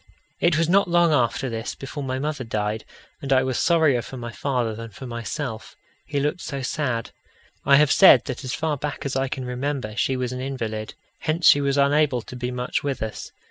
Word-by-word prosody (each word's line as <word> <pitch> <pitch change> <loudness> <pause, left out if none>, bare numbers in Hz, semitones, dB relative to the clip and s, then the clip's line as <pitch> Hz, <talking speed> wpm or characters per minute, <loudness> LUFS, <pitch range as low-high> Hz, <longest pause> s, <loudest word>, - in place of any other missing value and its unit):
It 170 -2 +3
was 165 0 +2
not 195 +3 +4
long 170 -2 +4
after 130 0 +1
this 115 -1 -4
before 135 +2 -7
my 130 -1 -2
mother 145 -1 -3
died, 110 -1 -2 0.4
and 135 - -5
I 130 -1 +5
was 130 -2 -1
sorrier 160 -7 +3
for 130 - -9
my 120 -1 -6
father 125 -3 -1
than 115 +1 -7
for 120 +5 -10
myself 115 0 -5 0.3
he 145 0 -1
looked 150 +5 -1
so 140 -3 -5
sad. 125 -4 -2 0.5
I 140 - +6
have 150 0 +5
said 195 - +7
that - - -5
as 130 -1 -3
far 155 -2 -1
back 145 +1 -5
as 140 - -2
I 135 0 +1
can 130 -1 -5
remember, 125 -3 -3
she 130 +3 0
was 125 -1 -2
an 125 0 -5
invalid. 115 -5 -4 0.2
Hence 165 +1 -1
she 145 - +7
was 140 0 +1
unable 140 -3 +3
to - - -10
be 125 0 -3
much 125 0 -2
with 140 -5 -2
us. 110 - -6
130 Hz, 215 wpm, -24 LUFS, 120-145 Hz, 0.5 s, said